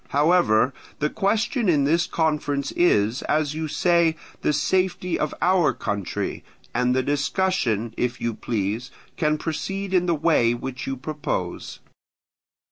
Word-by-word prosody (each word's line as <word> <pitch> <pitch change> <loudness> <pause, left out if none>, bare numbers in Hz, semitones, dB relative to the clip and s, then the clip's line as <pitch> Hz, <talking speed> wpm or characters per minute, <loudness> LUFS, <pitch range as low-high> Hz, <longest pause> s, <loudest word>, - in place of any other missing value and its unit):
However, 140 -6 +3 0.2
the 150 +1 -1
question 220 +2 +1
in 150 -4 +3
this 165 +5 +2
conference 150 -5 -1
is, 115 -8 +2
as 150 -1 +1
you 160 0 -3
say, 170 0 +2 0.3
the - - +2
safety 180 +3 0
of 150 - 0
our 180 -3 +3
country; 100 -2 -3 0.3
and 125 +1 +1
the 130 - +2
discussion, 145 - 0
if 125 +1 -1
you 115 -1 -1
please, 110 +2 -3 0.3
can 155 -1 +1
proceed 195 +5 -4
in 180 -1 +3
the 170 - +2
way 150 -7 +3
which 125 +1 -6
you 135 0 -2
propose. 150 +3 -4
150 Hz, 135 wpm, -24 LUFS, 125-175 Hz, 0.3 s, However